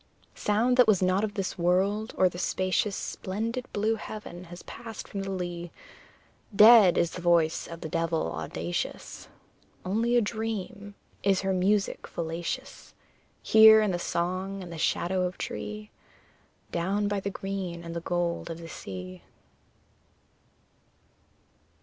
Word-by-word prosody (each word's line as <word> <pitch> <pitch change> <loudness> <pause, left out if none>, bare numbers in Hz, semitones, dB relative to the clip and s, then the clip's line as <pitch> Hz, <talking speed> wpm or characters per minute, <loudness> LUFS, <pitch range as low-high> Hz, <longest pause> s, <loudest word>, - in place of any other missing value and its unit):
Sound 230 +5 +1
that 250 -3 +6
was 195 -4 +4
not 185 +2 +2
of 210 -1 -2
this 195 -2 -3
world, 195 +5 +1
or 185 - +5
the 175 0 -5
spacious 185 +2 0
Splendid 230 +6 -4
blue 215 +2 +1
heaven, 205 -5 -8
has 175 +1 -11
passed 225 -2 -9
from 200 - -5
the 195 - -4
lea; 175 -2 -4 0.9
Dead 210 -3 +8
is 170 - +2
the 180 - -7
voice 170 -2 +2
of 165 0 -9
the - - -4
devil 165 - -1
audacious: 80 +2 -4 0.6
Only 225 +6 +1
a - - +7
dream 215 -1 -4 0.3
is 195 -1 +2
her 190 0 0
music 195 +2 +1
fallacious, 165 0 -5 0.5
Here, 220 0 +8
in 210 -2 +2
the 175 - -2
song 185 +3 -2
and 175 -1 -8
the 165 - -7
shadow 185 +4 0
of 180 0 -2
tree, 105 0 -6 0.8
Down 195 +4 0
by 205 0 -1
the 200 - -3
green 190 -3 -5
and 170 0 -7
the 170 - -3
gold 175 0 -2
of 165 - -5
the 165 -1 -10
sea. 90 - -8
185 Hz, 145 wpm, -28 LUFS, 170-205 Hz, 0.9 s, Dead